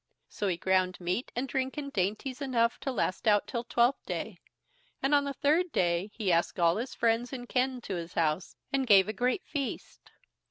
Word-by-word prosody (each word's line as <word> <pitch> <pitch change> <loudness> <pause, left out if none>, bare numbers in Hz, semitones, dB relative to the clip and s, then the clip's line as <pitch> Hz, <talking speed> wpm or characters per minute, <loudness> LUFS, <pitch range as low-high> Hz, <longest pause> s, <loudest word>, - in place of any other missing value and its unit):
So 205 - -3
he 180 -3 0
ground 185 0 +1
meat 180 +7 -2
and 250 +3 -1
drink 265 +2 -2
and 280 -1 -5
dainties 215 +8 -2
enough 235 -4 +1
to 270 0 -3
last 225 -4 -1
out 205 -1 +4
till 235 -2 -3
Twelfth 240 +2 +2
Day, - - -4 0.6
and 275 +2 +1
on 285 -1 +4
the 280 - -3
third 320 +5 +2
day 175 0 +1
he 210 -4 -1
asked 170 +2 +1
all 170 +1 +4
his 245 +4 -4
friends 235 +1 +1
and 245 -2 -6
kin 255 0 0
to 200 - -5
his 170 0 -7
house, 160 +2 0 0.2
and 270 -1 +1
gave 195 -3 +7
a 215 - -2
great 250 - 0
feast. 280 -3 -5
235 Hz, 200 wpm, -30 LUFS, 185-265 Hz, 0.6 s, gave